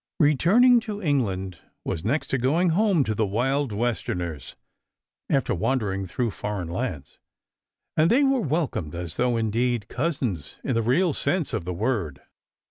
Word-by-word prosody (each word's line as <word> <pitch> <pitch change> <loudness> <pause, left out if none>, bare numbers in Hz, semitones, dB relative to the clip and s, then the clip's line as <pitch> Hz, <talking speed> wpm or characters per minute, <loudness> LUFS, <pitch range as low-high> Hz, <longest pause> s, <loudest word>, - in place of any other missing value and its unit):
] - - -67
Returning 195 - +5
to 215 -2 -6
England 100 - -1 0.3
was 80 - -3
next 140 +10 -1
to 135 - 0
going 160 +9 +2
home 185 -2 +3
to 110 - -1
the 110 0 0
wild 130 +6 0
Westerners, 90 - -3 0.7
after 135 -3 +1
wandering 95 -2 -1
through 115 +5 -1
foreign 100 -4 -4
lands, 85 - -4 0.8
and 160 +2 +4
they 265 +5 +4
were 270 -2 +3
welcomed 145 - -2
as 85 -1 -6
though 125 -1 +1
indeed 115 0 0
"cousins" 125 - -2
in - - -1
the 115 - +1
real 145 +9 +2
sense 175 0 -1
of - - -2
the 90 - -3
word. 95 - -1
120 Hz, 155 wpm, -25 LUFS, 95-155 Hz, 0.8 s, Returning